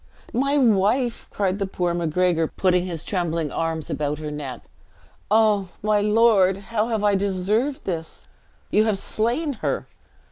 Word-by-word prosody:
"My 275 +4 +1
wife!" 230 0 +2
cried 195 -1 -1
the 195 - -1
poor 180 -2 -1
Macgregor, 170 0 +1
putting 180 +1 +1
his 165 -3 -4
trembling 165 -5 -2
arms 160 0 -2
about 150 0 -2
her 150 0 -5
neck: 145 -4 -6 0.7
"Oh, 210 -3 +3
my 210 0 +3
lord, 210 -3 +4 0.2
how 220 0 +1
have 220 -3 -1
I 205 -1 +3
deserved 200 +8 0
this? 165 -3 -5 0.4
You 215 - +4
have 215 -3 +2
slain 240 +10 -1
her!" - - -1
195 Hz, 145 wpm, -23 LUFS, 170-220 Hz, 0.7 s, lord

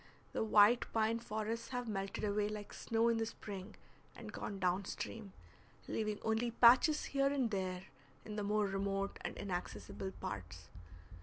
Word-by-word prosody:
The - - 0
white 220 +2 +5
pine 225 +1 +2
forests 220 0 -3
have 245 -2 -3
melted 195 -2 -3
away 205 0 +1
like 210 -1 -6
snow 230 0 +1
in 230 -1 +3
the 225 - +1
spring 200 -3 -7 0.4
and - - -9
gone 200 - -4
down 185 +1 +1
stream, 215 0 -5 0.6
leaving 215 -1 -1
only 225 +2 +1
patches 250 +6 +6
here 275 0 +3
and 270 -5 +1
there 185 -2 -2 0.4
in 210 - -6
the 210 - -2
more 210 +1 +2
remote 195 0 -1
and - - -5
inaccessible 105 - -4
parts. 85 -1 -6
210 Hz, 155 wpm, -36 LUFS, 195-230 Hz, 0.6 s, patches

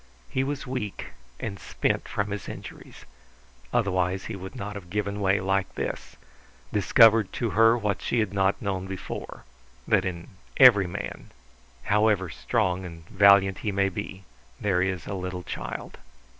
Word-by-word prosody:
He 130 - +1
was 140 +1 -3
weak 125 -6 -4 0.3
and 100 -4 -5
spent - - -1
from 100 0 -2
his 105 -3 -5
injuries; - - -10 0.7
otherwise 95 -5 0
he 110 - -5
would 95 -1 -8
not 105 +1 -5
have 100 -4 -9
given 105 +1 -2
way 95 0 +3
like 95 0 -1
this, - - -4 0.6
discovered 110 0 +5
to 115 -4 -2
her 115 +2 +5
what 105 -3 -2
she - - -1
had 110 -4 0
not 95 0 +1
known 95 -2 -2
before, 95 -1 -7 0.4
that - - +3
in 85 -2 -5 0.3
every 110 -8 +8
man, 100 +3 -6 0.5
however 105 -3 +2
strong 90 +3 -1
and 85 -2 -9
valiant 100 -1 +5
he 105 - -2
may 100 0 +1
be, 95 +1 -6 0.4
there 95 -3 +1
is 95 -3 -1
a - - -5
little 90 -1 -4
child. - - -6
100 Hz, 155 wpm, -26 LUFS, 95-105 Hz, 0.7 s, every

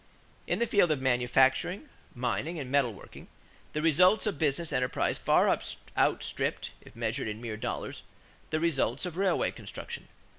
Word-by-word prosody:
= - - -31
In - - +2
the 235 - +2
field 200 -6 +3
of 150 -3 +1
manufacturing, 130 - +2 0.3
mining, 130 +7 -2
and 135 -4 -5
metal 140 -4 +3
working, 100 - -13 0.5
the 150 - -2
results 180 +7 +5
of 205 -9 -2
business 155 +2 +1
enterprise 125 0 0
far - - +4 0.5
outstripped, - - 0
if - - -16
measured 115 +2 -2
in 105 0 -4
mere 115 -2 -5
dollars, 110 - -4 0.5
the 155 - 0
results 145 -4 0
of 175 -2 -5
railway 190 -1 +1
construction. - - -8
140 Hz, 155 wpm, -29 LUFS, 125-170 Hz, 0.5 s, results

